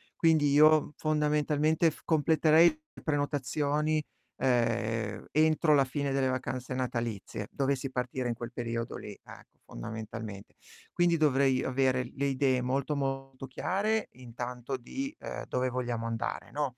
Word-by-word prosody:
Quindi 155 -3 +3
io, 155 +1 +5
fondamentalmente, 150 +1 +2
f - - -15
completerei 160 +1 +5
le 310 0 -14
prenotazioni, 145 +1 0 0.3
ehm, 115 -4 0
entro 155 0 +4
la 135 - +5
fine 140 +1 -2
delle 135 -1 +1
vacanze 130 0 -3
natalizie, 120 -5 -3
dovessi 135 -1 -1
partire 125 0 -2
in 120 - 0
quel 120 0 -7
periodo 115 -1 -4
lì, - - -8
ecco, - - -15
fondamentalmente. 110 - -7 0.4
Quindi 175 -1 +2
dovrei 135 -4 +3
avere 130 -1 +1
le 140 +1 -1
idee 130 -2 +2
molto, 135 +3 -1
molto 135 -1 -3
chiare 205 - -1
intanto 125 +1 -6
di, 270 - -5
uhm, - - -6
dove 130 0 0
vogliamo 120 -2 -2
andare, 115 0 -3
no. 140 -4 -2
135 Hz, 130 wpm, -30 LUFS, 125-150 Hz, 0.4 s, io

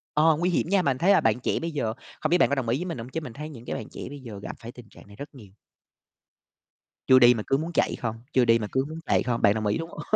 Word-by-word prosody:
ờ, 155 0 +4
nguy 175 +3 0
hiểm 175 - 0
nha. 195 0 +3
Bạn - - -5
mình - - -9
thấy 175 +8 +3
là 200 - +5
bạn 110 +2 +2
trẻ - - -1
bây 165 0 -4
giờ 120 -8 -2 0.3
không 155 - 0
biết 175 - +4
bạn - - +3
có 140 - +1
đồng 130 -4 -2
ý 120 - +1
với 175 - -4
mình 170 -7 -4
hông 115 +1 -7
chứ 160 +5 -4
mình 125 -7 -8
thấy 150 +4 -7
những 120 -6 -11
cái - - -4
bạn - - -7
trẻ - - -9
bây 145 +1 -9
giờ 115 -6 -9
gặp - - -6
phải 115 0 -9
tình 120 -3 -14
trạng - - -17
này 100 - -15
rất 140 +7 -8
nhiều. 105 -7 -14 1.6
Chưa 130 0 +7
đi 120 -1 +7
mà 110 -3 -4
cứ 135 - +2
muốn 160 +4 -4
chạy - - +1
không, 115 -2 -4 0.2
chưa 130 -2 +4
đi 115 0 +4
mà 105 - -3
cứ 130 0 0
muốn 160 +1 -7
chạy - - +2
không. 120 -1 -2
Bạn 100 - +5
đồng 110 -1 -2
ý, 105 - +1
đúng 165 - -5
h 150 - -3
130 Hz, 330 wpm, -26 LUFS, 115-155 Hz, 1.6 s, Chưa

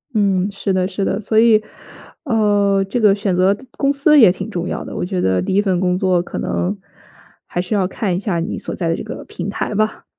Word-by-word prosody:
嗯， 195 -2 +2
是 195 0 -2
的 185 -1 +1
是 195 +1 -3
的， 195 - -1
所 215 +1 -1
以， 220 -1 +5 0.6
呃， 205 -5 +2
这 245 - -1
个 210 -3 +5
选 200 -2 -1
择 185 +2 +3 0.2
公 280 0 +2
司 300 +2 +4
也 215 -8 +8
挺 190 +3 -6
重 180 -4 -3
要 - - -4
的， - - -8
我 - - -2
觉 180 -1 -2
得 95 -1 +1
第 185 - -2
1 200 - +4
份 190 -4 0
工 180 -1 +1
作 185 -1 +2
可 175 - -6
能 185 +4 -1 0.7
还 175 - -3
是 185 +4 -2
要 190 -3 +1
看 190 -1 -2
一 - - -1
下 190 -3 -2
你 165 - -3
所 - - -6
在 170 -3 -2
的 165 - +1
这 - - -6
个 - - -7
平 180 +2 -6
台 205 - -3
吧， 215 +1 -1
195 Hz, 255 characters per minute, -18 LUFS, 180-215 Hz, 0.7 s, 也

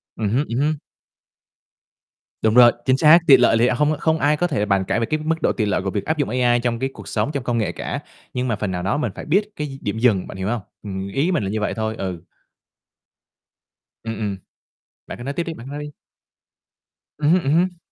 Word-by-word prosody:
Ừm 105 -2 -1
hứm. 130 +8 +1
Ừm 115 - -3
hứm. 150 +2 +1 1.7
Đúng 110 - +2
rồi, 120 -1 +8
chính 130 0 +3
xác. 155 +3 +7
Tiện 135 - +8
lợi 115 - +5
thì 120 - +4
hông 150 +4 +1
không 160 0 +1
ai 150 +1 +2
có 175 - +1
thể 135 -10 -1
bàn 100 -2 +1
cãi 110 - 0
về 115 - 0
cái 155 +6 -1
mức 160 +1 -1
độ - - +2
tiện 105 -3 -1
lợi 100 - +1
của 95 - -2
việc 100 - -3
áp 155 - -1
dụng 145 - 0
AI 120 0 +2
trong 120 -1 -1
cái 135 - -1
cuộc - - -11
sống, - - -1
trong 140 -4 -3
công 120 -1 -1
nghệ 110 - 0
cả. - - -4 0.3
Nhưng 125 0 -1
mà 115 - 0
phần 100 -1 -3
nào 90 -1 -3
đó 100 +7 0
mình 150 - -1
phải - - -7
biết 200 +7 +1
cái 150 - -3
d 135 -1 -10
điểm 105 +2 -2
dừng, 110 -6 +2
bạn - - -9
hiểu 95 0 -3
hông? 115 0 -1 0.2
Ừm, 95 -2 -5
ý 140 - 0
mình 170 - 0
là 95 - -2
như 110 +2 -2
vậy - - -1
thôi. 110 0 -2
Ừ. 90 -3 -5 1.8
Ừm, 115 -1 -4
ừm. 100 -2 -2 0.7
Bạn - - -8
cứ 120 - -8
nói 140 - -3
tiếp 170 - -1
đi, 165 - -5
bạn 125 -3 -10
nói 145 +1 -6
đi. 150 - -7 1.3
Ừm 150 0 +1
hứm, 180 -1 +3
ừm 140 - +1
hứm. 180 +2 +1
125 Hz, 250 wpm, -21 LUFS, 105-150 Hz, 1.8 s, rồi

